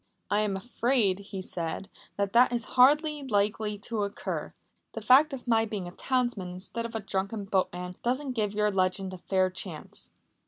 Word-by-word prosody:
"I 205 Hz, -, +3 dB
am 205 Hz, -2 st, 0 dB
afraid," 230 Hz, -2 st, +1 dB
he 195 Hz, -1 st, -7 dB
said, 170 Hz, +1 st, -4 dB, 0.3 s
"that 200 Hz, -1 st, -1 dB
that 245 Hz, +2 st, +6 dB
is 235 Hz, -2 st, -1 dB
hardly 295 Hz, +4 st, +5 dB
likely 210 Hz, -3 st, 0 dB
to 215 Hz, +1 st, -3 dB
occur. 200 Hz, 0 st, -3 dB, 0.4 s
The -, -, -5 dB
fact 280 Hz, +5 st, +6 dB
of 265 Hz, -2 st, -7 dB
my 225 Hz, -1 st, +4 dB
being 205 Hz, -4 st, -4 dB
a -, -, -7 dB
townsman 240 Hz, -4 st, -1 dB
instead 190 Hz, +6 st, -5 dB
of 230 Hz, -, -11 dB
a -, -, 0 dB
drunken 200 Hz, +1 st, -3 dB
boatman 180 Hz, -2 st, -1 dB
doesn't 260 Hz, +3 st, 0 dB
give 210 Hz, -4 st, -1 dB
your 210 Hz, 0 st, +2 dB
legend 190 Hz, 0 st, 0 dB
a 185 Hz, -, -8 dB
fair 185 Hz, +1 st, +1 dB
chance!" 185 Hz, -4 st, -4 dB
210 Hz, 180 wpm, -28 LUFS, 190-240 Hz, 0.4 s, that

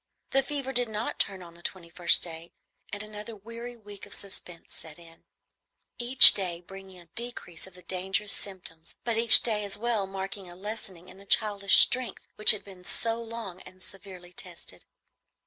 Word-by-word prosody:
The 270 Hz, -, +2 dB
fever 275 Hz, -1 st, -6 dB
did 245 Hz, -2 st, +1 dB
not 215 Hz, +1 st, -6 dB
turn 190 Hz, -2 st, -1 dB
on 170 Hz, -1 st, -15 dB
the 170 Hz, -, -17 dB
twenty 170 Hz, -2 st, -6 dB
first 175 Hz, -2 st, +3 dB
day, 165 Hz, 0 st, -9 dB, 0.4 s
and 205 Hz, 0 st, -3 dB
another 215 Hz, +1 st, -10 dB
weary 230 Hz, +3 st, -11 dB
week 205 Hz, -2 st, -13 dB
of 205 Hz, -, -11 dB
suspense 180 Hz, -3 st, -6 dB
set 155 Hz, -2 st, -11 dB
in, 165 Hz, -1 st, -19 dB, 0.7 s
each 245 Hz, +2 st, +10 dB
day 180 Hz, -4 st, -5 dB
bringing 190 Hz, +1 st, -14 dB
a 175 Hz, -, -16 dB
decrease 190 Hz, -3 st, -7 dB
of 190 Hz, -, -18 dB
the 180 Hz, -, -17 dB
dangerous 190 Hz, +3 st, -3 dB
symptoms, 175 Hz, -4 st, -6 dB
but 235 Hz, -2 st, -2 dB
each 230 Hz, -1 st, +9 dB
day 215 Hz, -3 st, -1 dB
as 200 Hz, 0 st, -4 dB
well 220 Hz, -3 st, -3 dB
marking 195 Hz, 0 st, -7 dB
a 175 Hz, -, -13 dB
lessening 190 Hz, -3 st, -10 dB
in 185 Hz, +1 st, -16 dB
the 200 Hz, -, -17 dB
childish 200 Hz, -2 st, +2 dB
strength 250 Hz, -5 st, +1 dB
which 210 Hz, -, +4 dB
had 215 Hz, -, +8 dB
been 190 Hz, -2 st, -15 dB
so 230 Hz, +5 st, -2 dB
long 225 Hz, -5 st, -9 dB
and 185 Hz, 0 st, -13 dB
severely 185 Hz, -3 st, -10 dB
tested. -, -, -10 dB
195 Hz, 180 wpm, -26 LUFS, 180-220 Hz, 0.7 s, each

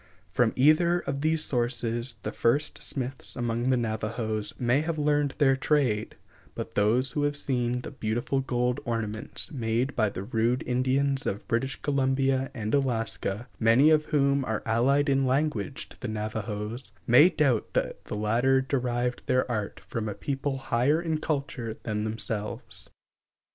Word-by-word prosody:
From -, -, +3 dB
either 170 Hz, +6 st, +4 dB
of 140 Hz, 0 st, -3 dB
these 155 Hz, 0 st, +1 dB
sources 120 Hz, -1 st, -1 dB
the -, -, -2 dB
first 145 Hz, +6 st, +1 dB
smiths 130 Hz, -1 st, -3 dB
among 120 Hz, 0 st, -1 dB
the 130 Hz, -, +3 dB
Navajos 110 Hz, -1 st, -2 dB
may 125 Hz, +3 st, +2 dB
have 160 Hz, 0 st, -2 dB
learned 145 Hz, -1 st, +1 dB
their 135 Hz, -3 st, +4 dB
trade; 130 Hz, -7 st, +1 dB, 0.4 s
but -, -, -5 dB
those 120 Hz, +6 st, +2 dB
who 150 Hz, -, -1 dB
have 145 Hz, 0 st, +1 dB
seen 125 Hz, -3 st, -1 dB
the -, -, -7 dB
beautiful 120 Hz, +1 st, -1 dB
gold 125 Hz, -2 st, 0 dB
ornaments 110 Hz, -2 st, -3 dB
made 120 Hz, -1 st, -1 dB
by 110 Hz, -3 st, +2 dB
the 95 Hz, -1 st, -6 dB
rude 115 Hz, +3 st, 0 dB
Indians 135 Hz, +2 st, +1 dB
of 100 Hz, -, -3 dB
British 125 Hz, +3 st, -1 dB
Columbia 135 Hz, -1 st, +1 dB
and 110 Hz, -3 st, -3 dB
Alaska, 120 Hz, -5 st, -1 dB
many 120 Hz, +7 st, +5 dB
of 155 Hz, -1 st, +4 dB
whom 140 Hz, -2 st, +2 dB
are 110 Hz, -3 st, -2 dB
allied 135 Hz, +6 st, +3 dB
in 135 Hz, -1 st, +3 dB
language 130 Hz, -6 st, -1 dB
to -, -, -16 dB
the -, -, -4 dB
Navajos, 110 Hz, +2 st, -4 dB
may 135 Hz, +9 st, +7 dB
doubt 135 Hz, -, +1 dB
that -, -, -1 dB
the -, -, -5 dB
latter 120 Hz, +6 st, +2 dB
derived 125 Hz, -2 st, -1 dB
their 130 Hz, 0 st, +3 dB
art 105 Hz, -3 st, -3 dB
from 110 Hz, -2 st, -3 dB
a 100 Hz, -, -5 dB
people 135 Hz, +5 st, -2 dB
higher 130 Hz, +3 st, +1 dB
in 160 Hz, -2 st, -1 dB
culture 140 Hz, -7 st, -3 dB
than 105 Hz, -1 st, -2 dB
themselves. 110 Hz, -1 st, -4 dB
125 Hz, 155 wpm, -27 LUFS, 115-140 Hz, 0.4 s, may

